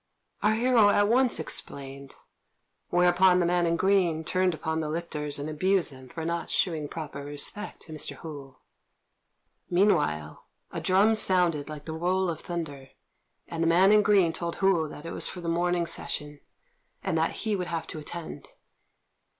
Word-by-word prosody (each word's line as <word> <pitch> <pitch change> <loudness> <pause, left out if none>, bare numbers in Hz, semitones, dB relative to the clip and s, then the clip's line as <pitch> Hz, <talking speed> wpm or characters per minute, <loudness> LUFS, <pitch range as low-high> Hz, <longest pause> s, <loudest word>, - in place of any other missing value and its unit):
Our 215 +1 +3
hero 230 -2 +4
at 205 0 +3
once 250 0 +3
explained; 140 -3 -5 0.7
whereupon 180 +1 +4
the 175 - +2
man 175 0 +2
in 165 - +2
green 180 -3 +2
turned 185 +1 +1
upon 160 0 -2
the 155 -1 -2
lictors 150 -3 -3
and 145 +1 -5
abused 180 +3 +1
them 130 -1 -13
for 160 +4 -6
not 170 0 -2
shewing 160 -5 0
proper 145 -2 -7
respect 145 +9 -3
to 160 - -10
Mr. 155 - -4
Hou. 140 -5 -10 1.1
Meanwhile 150 - +1 0.3
a - - -4
drum 195 +4 +4
sounded 180 -8 +2
like 150 -1 -8
the 160 - -5
roll 180 +3 0
of 160 - -6
thunder, 145 -6 -6 0.6
and 165 -1 -4
the 165 - +2
man 180 +4 +5
in 210 0 +6
green 195 -5 +3
told 170 +1 -3
Hou 190 -5 +2
that 150 +1 -10
it 165 - -5
was - - 0
for 180 - -6
the 170 - -6
morning 175 +1 +1
session, 150 -3 -4 0.6
and - - -1
that - - +1
he 215 -2 +1
would 180 -2 -3
have 165 -1 -3
to 155 - -7
attend. 165 +2 -8
170 Hz, 170 wpm, -27 LUFS, 150-185 Hz, 1.1 s, in